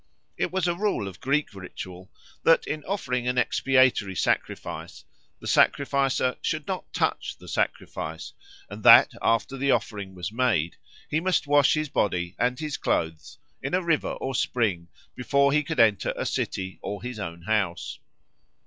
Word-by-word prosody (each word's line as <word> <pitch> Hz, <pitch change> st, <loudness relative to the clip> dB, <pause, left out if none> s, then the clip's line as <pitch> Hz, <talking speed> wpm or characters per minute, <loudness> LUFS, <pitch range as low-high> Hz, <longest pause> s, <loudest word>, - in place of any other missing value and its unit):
It -, -, -1 dB
was 185 Hz, -1 st, 0 dB
a 175 Hz, -, +2 dB
rule 195 Hz, -, -1 dB
of 95 Hz, -, -9 dB
Greek 140 Hz, -1 st, 0 dB
ritual 95 Hz, -1 st, -9 dB, 0.3 s
that, 165 Hz, -, +4 dB
in 150 Hz, 0 st, -4 dB
offering 125 Hz, -11 st, -2 dB
an 125 Hz, 0 st, 0 dB
expiatory 130 Hz, -6 st, +3 dB
sacrifice, -, -, -2 dB, 0.3 s
the -, -, -12 dB
sacrificer 135 Hz, -2 st, +2 dB
should -, -, -2 dB
not -, -, -5 dB
touch -, -, -1 dB
the -, -, -15 dB
sacrifice, -, -, -3 dB, 0.3 s
and -, -, -9 dB
that, -, -, +8 dB
after 115 Hz, +4 st, +1 dB
the 140 Hz, +1 st, 0 dB
offering 100 Hz, -7 st, -1 dB
was 90 Hz, +1 st, -5 dB
made, 110 Hz, -9 st, +1 dB, 0.3 s
he 155 Hz, -, 0 dB
must 180 Hz, 0 st, +1 dB
wash 145 Hz, 0 st, +4 dB
his 155 Hz, 0 st, -1 dB
body 90 Hz, -7 st, -1 dB
and 125 Hz, +2 st, +1 dB
his 155 Hz, -3 st, -3 dB
clothes 80 Hz, -1 st, -2 dB, 0.2 s
in 135 Hz, +6 st, -1 dB
a 185 Hz, -, 0 dB
river 165 Hz, -4 st, 0 dB
or 135 Hz, -, -4 dB
spring 105 Hz, -9 st, 0 dB, 0.3 s
before 140 Hz, +3 st, +2 dB
he 150 Hz, -, +4 dB
could 155 Hz, +2 st, -4 dB
enter 110 Hz, -4 st, +3 dB
a -, -, -2 dB
city 95 Hz, -1 st, -3 dB
or 105 Hz, +2 st, -5 dB
his 125 Hz, -3 st, -5 dB
own 85 Hz, -3 st, -6 dB
house. 100 Hz, -4 st, -1 dB
125 Hz, 160 wpm, -26 LUFS, 95-145 Hz, 0.3 s, that